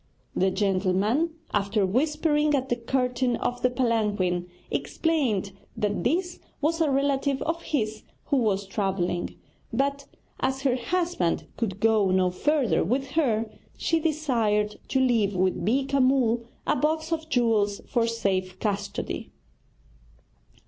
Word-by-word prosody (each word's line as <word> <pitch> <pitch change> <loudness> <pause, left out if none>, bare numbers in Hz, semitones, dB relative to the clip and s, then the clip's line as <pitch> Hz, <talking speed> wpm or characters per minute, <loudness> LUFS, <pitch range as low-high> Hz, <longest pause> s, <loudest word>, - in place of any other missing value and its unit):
The 190 - +3
gentleman, 200 - +1 0.2
after 200 0 +1
whispering 300 - +2
at 265 -1 -1
the 240 - +2
curtain 250 0 0
of 245 0 -2
the 250 - +3
palanquin, 210 -8 0 0.2
explained 260 - 0 0.3
that 205 -1 -1
this 350 +5 0 0.2
was 325 +3 0
a 315 - +3
relative 275 0 +1
of 330 +1 -2
his 220 -9 -2 0.2
who 285 - +1
was 200 -5 +1
travelling, 190 -3 -1 0.4
but 280 +3 -1 0.3
as 265 +1 -1
her 260 -3 +3
husband 335 - 0
could 200 -4 -3
go 220 -2 +3
no 185 -1 +3
further 255 - +1
with 265 +9 -1
her, 230 -8 +1 0.3
she 330 - +1
desired 235 -10 0
to 265 - +1
leave 230 -6 +2
with 185 0 +1
Beeka 270 +6 +2
Mull 245 -3 +3 0.2
a - - +2
box 315 +2 0
of 320 -1 -2
jewels 225 -6 +2
for 235 -2 +1
safe 190 -5 -1
custody. 205 -2 -3
240 Hz, 130 wpm, -26 LUFS, 205-280 Hz, 0.4 s, The